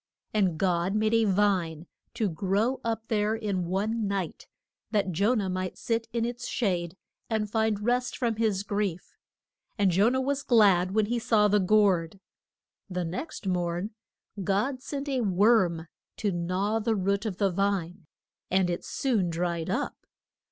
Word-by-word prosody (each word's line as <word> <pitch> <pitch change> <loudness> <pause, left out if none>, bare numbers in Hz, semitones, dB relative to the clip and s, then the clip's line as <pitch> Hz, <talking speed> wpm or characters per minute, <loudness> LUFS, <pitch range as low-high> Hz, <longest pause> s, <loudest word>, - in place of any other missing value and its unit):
And 190 -6 +2
God 180 +1 +1
made 215 +1 +1
a 225 -1 +4
vine 185 -5 +1 0.3
to 225 -3 +1
grow 200 +8 0
up 225 -1 -2
there 215 0 +1
in 200 -5 -2
one 210 +4 -1
night, 195 -4 -3 0.4
that 205 -4 0
Jo 200 +9 +2
nah 205 -4 0
might 185 0 -3
sit 230 -1 -1
in 230 0 0
its 240 +1 -4
shade 180 -5 -1 0.3
and 220 -2 0
find 220 -2 +1
rest 245 +1 0
from 230 -3 0
his 215 -4 +1
grief. 200 -4 -3 0.6
And 200 -3 +3
Jo 200 +6 +4
nah 260 +1 0
was 275 +1 -1
glad 200 -7 +4
when 215 -1 +3
he 240 +3 -1
saw 215 -2 +3
the 210 0 +3
gourd. 195 -3 +2 0.7
The 180 -1 -2
next 190 - -5
morn 175 +2 -1 0.5
God 215 +8 0
sent 280 +1 -5
a 265 -3 0
worm 190 -4 +3 0.3
to 205 - 0
gnaw 185 +5 -1
the 225 0 0
root 200 +2 0
of 190 -4 -4
the 200 -2 +2
vine, 185 -2 -1 0.4
and 185 -1 +2
it 175 - -3
soon 220 -10 0
dried 170 -1 -2
up. - - -3
200 Hz, 160 wpm, -28 LUFS, 185-225 Hz, 0.7 s, a